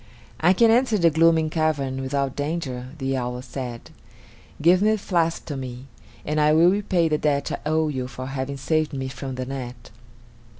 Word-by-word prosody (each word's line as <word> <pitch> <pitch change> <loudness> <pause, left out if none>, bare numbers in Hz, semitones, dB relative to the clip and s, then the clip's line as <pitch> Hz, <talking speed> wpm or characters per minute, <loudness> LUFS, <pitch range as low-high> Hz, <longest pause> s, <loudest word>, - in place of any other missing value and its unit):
"I 175 +3 +5
can 225 +4 +5
enter 235 -2 +3
the 170 -3 +4
gloomy 160 0 +4
cavern 145 -5 -1
without 135 0 -2
danger," 145 -4 -3
the 135 -1 -1
owl 125 -1 -3
said. 125 -2 -7 0.7
"Give 175 +4 +5
the 215 +2 +3
flask 170 -4 -1
to 145 - -5
me, 130 -1 -7 0.4
and 150 +1 0
I 150 0 +4
will 170 +3 +6
repay 190 -4 +1
the 155 -1 0
debt 145 -2 0
I 150 - -4
owe 160 0 +2
you 130 -4 -3
for 130 +1 -7
having 135 +1 -4
saved 155 +2 0
me 130 -1 -3
from 135 0 -6
the 130 0 -4
net." 125 -2 -7
145 Hz, 180 wpm, -24 LUFS, 130-165 Hz, 0.7 s, will